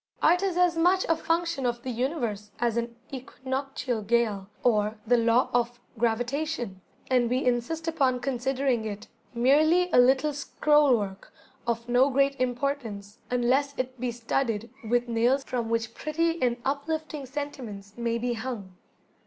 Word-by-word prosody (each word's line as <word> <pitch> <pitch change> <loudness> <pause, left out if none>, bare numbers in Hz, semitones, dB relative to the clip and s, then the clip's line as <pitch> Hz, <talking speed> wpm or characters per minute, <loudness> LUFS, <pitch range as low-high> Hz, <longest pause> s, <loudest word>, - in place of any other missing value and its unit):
Art 350 +3 +5
is 380 -3 0
as 355 -1 +4
much 360 +3 +3
a 330 - +3
function 330 -3 -1
of 240 -1 -1
the 255 - -3
Universe 235 -5 -2
as 235 -1 0
an 235 0 -2 0.2
Equinoctial 260 -2 -3
gale, 210 -3 0
or 215 -2 +2
the 245 +2 +4
Law 235 +1 +3
of 240 0 0 0.2
Gravitation; 240 -1 -1 0.3
and 245 -2 +3
we 255 +2 0
insist 250 +7 0
upon 270 -6 +2
considering 260 -1 0
it 210 -1 -6 0.3
merely 310 +9 +4
a - - +6
little 265 +4 +4
scroll 295 -2 +3
work, 195 -2 -6 0.4
of 235 0 -1
no 250 +3 +4
great 275 +1 +2
importance 245 -6 -2
unless 260 +3 +1
it 255 0 -3
be 250 0 -1
studded 230 -1 -2
with 240 +2 +1
nails 240 +4 +2
from 240 -4 -3
which 230 0 -1
pretty 330 +4 -1
and 245 -1 +2
uplifting 295 +1 -2
sentiments 245 -8 -6
may 235 -1 -1
be 240 +1 -1
hung! 220 -6 -6
250 Hz, 150 wpm, -27 LUFS, 235-280 Hz, 0.4 s, a